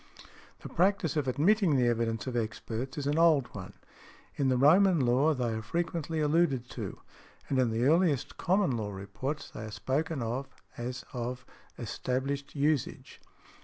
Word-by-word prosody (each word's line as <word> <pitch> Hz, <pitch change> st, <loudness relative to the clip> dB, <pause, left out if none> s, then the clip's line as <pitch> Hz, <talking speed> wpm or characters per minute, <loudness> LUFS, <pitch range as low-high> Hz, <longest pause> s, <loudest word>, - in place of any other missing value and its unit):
The -, -, -8 dB
practice 185 Hz, -4 st, +1 dB
of 150 Hz, -3 st, 0 dB
admitting 170 Hz, -, +3 dB
the 125 Hz, -2 st, +3 dB
evidence 115 Hz, -1 st, 0 dB
of 130 Hz, -2 st, -4 dB
experts 115 Hz, +4 st, -3 dB
is 145 Hz, -, -3 dB
an 145 Hz, +3 st, +1 dB
old 155 Hz, -7 st, +4 dB
one: 95 Hz, -3 st, -8 dB, 0.6 s
in 135 Hz, -2 st, +1 dB
the 130 Hz, -, +2 dB
Roman 170 Hz, +6 st, +5 dB
Law 135 Hz, +5 st, +3 dB
they 120 Hz, -3 st, -1 dB
are 110 Hz, -, -3 dB
frequently 165 Hz, +3 st, -2 dB
alluded 150 Hz, -5 st, +2 dB
to, -, -, -6 dB, 0.5 s
and 135 Hz, -, +1 dB
in 125 Hz, -2 st, +3 dB
the 115 Hz, +1 st, -1 dB
earliest 155 Hz, -1 st, +2 dB
Common 190 Hz, -2 st, +2 dB
Law 110 Hz, -3 st, -3 dB
reports 100 Hz, +9 st, -5 dB
they -, -, -8 dB
are 110 Hz, -, -6 dB
spoken 135 Hz, +6 st, -2 dB
of 125 Hz, +4 st, -3 dB, 0.3 s
as 125 Hz, +1 st, -5 dB
of 125 Hz, +1 st, -4 dB, 0.3 s
established 135 Hz, +4 st, -3 dB
usage. 145 Hz, -2 st, -1 dB
135 Hz, 160 wpm, -30 LUFS, 120-155 Hz, 0.6 s, Roman